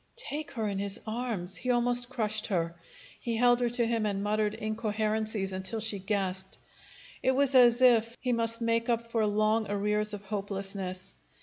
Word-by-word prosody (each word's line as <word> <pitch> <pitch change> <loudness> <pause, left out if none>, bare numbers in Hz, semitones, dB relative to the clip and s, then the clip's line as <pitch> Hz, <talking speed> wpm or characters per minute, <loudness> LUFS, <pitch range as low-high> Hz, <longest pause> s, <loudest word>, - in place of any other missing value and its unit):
Take 310 - -4
her 225 -4 -2
in 200 -1 -2
his 200 0 -3
arms! 220 -5 -2
He 255 - -4
almost 245 0 +2
crushed 215 -4 -1
her. 170 -5 -1 0.5
He 235 -1 -2
held 245 +1 +4
her 245 -1 +1
to 240 0 +1
him 230 -2 0
and 200 -1 -2
muttered 210 0 0
incoherencies 215 -2 -2
until 190 +4 -2
she 215 -2 +1
gasped. 190 -1 -2 0.6
It 260 - +2
was 280 0 +2
as 245 -1 +6
if 235 -1 +4
he 250 -1 0
must 230 0 0
make 230 +1 +1
up 230 0 -1
for 225 -2 +1
long 215 +1 +1
arrears 210 +1 0
of 205 - -10
hopelessness. 195 -2 -5
220 Hz, 175 wpm, -29 LUFS, 200-235 Hz, 0.6 s, as